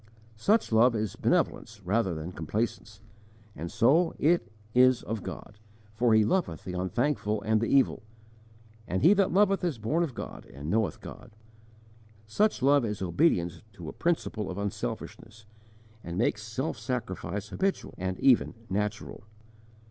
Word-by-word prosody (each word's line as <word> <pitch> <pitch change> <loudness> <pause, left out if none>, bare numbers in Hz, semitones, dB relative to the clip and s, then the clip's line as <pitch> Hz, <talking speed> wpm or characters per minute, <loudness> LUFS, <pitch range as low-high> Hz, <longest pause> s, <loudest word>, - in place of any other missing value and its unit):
Such 210 - +2
love 115 +2 +5
is 110 -3 -2
benevolence 110 -2 0
rather 95 -2 +1
than 80 +3 -5
complacence, 105 +5 -4 0.5
and 85 +1 -6
so 140 - +3
it 155 -7 +2 0.2
is 125 0 +5
"of 110 -1 -4
God," 105 0 -9 0.3
for 115 0 +3
He 110 -1 +5
loveth 110 - -1
the 90 - -6
unthankful 105 - -1
and 110 0 +2
the 115 - 0
evil: 135 -6 +3 0.9
and 95 - -1
he 185 - +8
that 200 -2 +2
loveth 195 0 +3
is 170 -8 -1
born 130 +11 0
of 150 -8 -2
God - - -8
and 70 +5 -6
knoweth 110 0 0
God. - - -10 1.0
Such 135 - +1
love 140 0 +5
is 105 -3 -3
obedience 90 - +1
to 85 -6 -8
a - - -8
principle 115 - -1
of 90 - -5
unselfishness, 110 +1 -5 0.6
and 85 0 -5
makes 110 0 +1
self 110 +8 -4
sacrifice 105 -4 -4
habitual 195 0 -2
and 95 0 -3
even 130 -4 +4 0.2
natural. 105 +2 -3
110 Hz, 150 wpm, -28 LUFS, 100-135 Hz, 1.0 s, he